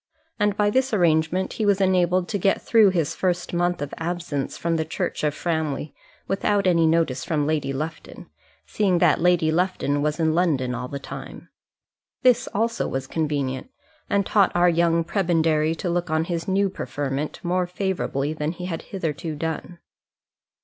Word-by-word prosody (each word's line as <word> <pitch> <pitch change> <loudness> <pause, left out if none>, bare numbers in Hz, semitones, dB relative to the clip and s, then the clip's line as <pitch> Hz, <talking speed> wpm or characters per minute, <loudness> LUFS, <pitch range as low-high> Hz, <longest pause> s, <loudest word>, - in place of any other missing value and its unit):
And 205 -1 +1
by 205 0 +2
this 260 0 +1
arrangement 170 +1 +2
he 220 - -2
was 200 -1 +3
enabled 185 -1 +2
to 205 - -1
get 195 +2 +2
through 220 -4 +5
his 165 -4 0
first 180 -1 -1
month 175 -2 0
of 145 - -7
absence 165 -4 -3
from 170 0 -1
the 160 - 0
church 160 0 -3
of 150 -1 +1
Framley 155 -4 -2 0.3
without 200 +1 +1
any 170 -3 +4
notice 160 -5 +1
from 150 -3 0
Lady 150 -3 0
Lufton, 155 +4 -6 0.4
seeing 195 -4 +1
that 170 -3 +3
Lady 175 -2 +3
Lufton 165 -4 0
was 150 +2 -1
in 160 -1 +2
London 150 -8 +1
all 125 +1 -4
the 140 - -5
time. 140 - -9 0.7
This 255 0 +4
also 230 +3 -1
was 135 0 -3
convenient, 145 - -2 0.4
and 200 -2 +2
taught 200 -3 +3
our 175 0 +5
young 170 0 +2
prebendary 165 -3 +1
to 180 - -4
look 175 0 -1
on 160 0 +1
his 170 +2 -3
new 195 +1 +2
preferment 140 -3 -4
more 180 0 0
favourably 180 -6 -2
than 155 +1 -2
he 180 +1 -7
had 165 -3 -4
hitherto 160 -4 -4
done. 160 +3 -4
170 Hz, 170 wpm, -24 LUFS, 155-185 Hz, 0.7 s, through